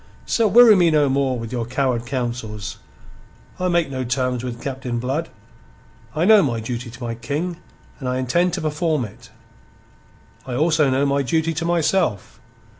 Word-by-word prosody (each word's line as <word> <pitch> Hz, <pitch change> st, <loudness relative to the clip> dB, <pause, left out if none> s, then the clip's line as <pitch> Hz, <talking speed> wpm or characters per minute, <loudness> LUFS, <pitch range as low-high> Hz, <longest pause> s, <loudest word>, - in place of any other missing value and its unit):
So 230 Hz, -2 st, +2 dB
weary 225 Hz, +1 st, +8 dB
me 175 Hz, -3 st, +4 dB
no 150 Hz, -3 st, +3 dB
more 135 Hz, -1 st, +1 dB
with 115 Hz, -1 st, -6 dB
your 120 Hz, -2 st, -2 dB
coward 125 Hz, -2 st, -1 dB
counsels. 120 Hz, -5 st, -4 dB, 0.8 s
I 185 Hz, -, 0 dB
make 170 Hz, -4 st, +1 dB
no 130 Hz, -1 st, -3 dB
terms 125 Hz, -1 st, -1 dB
with 120 Hz, -2 st, -5 dB
Captain 130 Hz, -3 st, -4 dB
Blood. 135 Hz, +7 st, -2 dB, 0.9 s
I 160 Hz, +3 st, +1 dB
know 215 Hz, 0 st, +7 dB
my 120 Hz, -8 st, -1 dB
duty 120 Hz, +2 st, -5 dB
to 120 Hz, +2 st, -10 dB
my 115 Hz, -1 st, -3 dB
King, 150 Hz, +9 st, -3 dB, 0.4 s
and 130 Hz, -3 st, -3 dB
I 125 Hz, -, -1 dB
intend 170 Hz, +8 st, +1 dB
to 180 Hz, -, -2 dB
perform 155 Hz, -3 st, 0 dB
it. 105 Hz, -, -13 dB, 1.1 s
I 125 Hz, -2 st, -5 dB
also 155 Hz, 0 st, +3 dB
know 135 Hz, +2 st, +2 dB
my 140 Hz, 0 st, +1 dB
duty 160 Hz, +5 st, 0 dB
to 165 Hz, +2 st, -3 dB
myself. 170 Hz, -, 0 dB
135 Hz, 170 wpm, -21 LUFS, 125-165 Hz, 1.1 s, weary